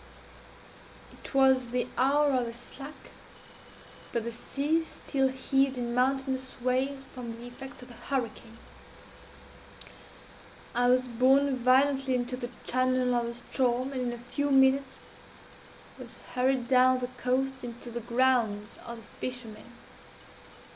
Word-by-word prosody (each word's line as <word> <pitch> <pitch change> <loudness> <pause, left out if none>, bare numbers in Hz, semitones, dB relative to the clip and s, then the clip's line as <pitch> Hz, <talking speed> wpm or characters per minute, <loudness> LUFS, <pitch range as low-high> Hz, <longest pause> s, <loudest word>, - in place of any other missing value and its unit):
_ - - -16
It - - -11
was 265 -1 +5
the 245 0 0
20 - - -11
hour 285 +3 +3
of 250 -3 +1
the 230 - -5
slack, 275 +5 -10 1.0
but 235 - -1
the 235 - -4
sea 290 +7 0
still 270 -4 -1
heaved 265 0 +1
in 240 -1 -2
mountainous 260 +1 0
waves 260 +2 0
from 240 -2 -6
the 235 - -10
effects 255 +1 -10
of 250 - -13
the - - -11
hurricane. 235 -2 -4 2.2
I 245 0 +2
was 255 0 +4
borne 265 +3 +3
violently 265 +1 +3
into 245 0 -1
the 245 -1 -5
channel 255 0 +1
of 240 -1 +1
the 235 - -4
Ström, 250 +2 0
and 260 -2 -3
in 245 -1 -1
a 240 - -5
few 285 +4 -2
minutes 270 0 +3 0.9
was - - -8 0.2
hurried 255 0 +1
down 255 0 +5
the 250 -1 -3
coast 260 +1 -1
into 240 0 -7
the 240 +1 -4
'grounds' 235 -4 +1
of 235 0 -7
the 225 - -12 0.2
fishermen. 240 -3 -5
255 Hz, 140 wpm, -29 LUFS, 240-265 Hz, 2.2 s, was